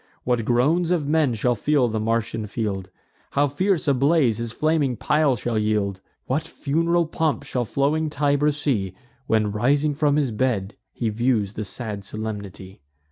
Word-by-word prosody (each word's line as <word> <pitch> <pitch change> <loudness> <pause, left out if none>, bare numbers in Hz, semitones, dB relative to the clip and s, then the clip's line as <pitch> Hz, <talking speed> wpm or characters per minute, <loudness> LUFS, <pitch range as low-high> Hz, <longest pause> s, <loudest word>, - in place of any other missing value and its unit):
What 120 -3 0
groans 150 +9 +2
of 170 -5 +1
men 150 -5 +2
shall 120 +3 +1
fill 135 +3 +2
the 110 -1 -2
Martian 115 0 -1
field! 100 -4 -3 0.4
How 145 +1 +3
fierce 180 +4 0
a 140 - +5
blaze 135 -4 +2
his 115 -1 -4
flaming 150 -3 +1
pile 150 -3 +2
shall 115 -1 -1
yield! 105 -3 0 0.2
What 135 +5 0
fun'ral 165 +4 0
pomp 160 -2 -1
shall 125 -4 -2
floating 150 +7 0
Tiber 145 0 +2
see, 120 -11 -1 0.3
When, 110 -2 +2
rising 140 +8 +2
from 145 0 +2
his 145 -5 +1
bed, 110 -3 -1 0.2
he 115 - -2
views 110 -2 0
the 110 - -4
sad 105 -1 -6
solemnity! 100 -3 -7
125 Hz, 160 wpm, -23 LUFS, 110-150 Hz, 0.4 s, a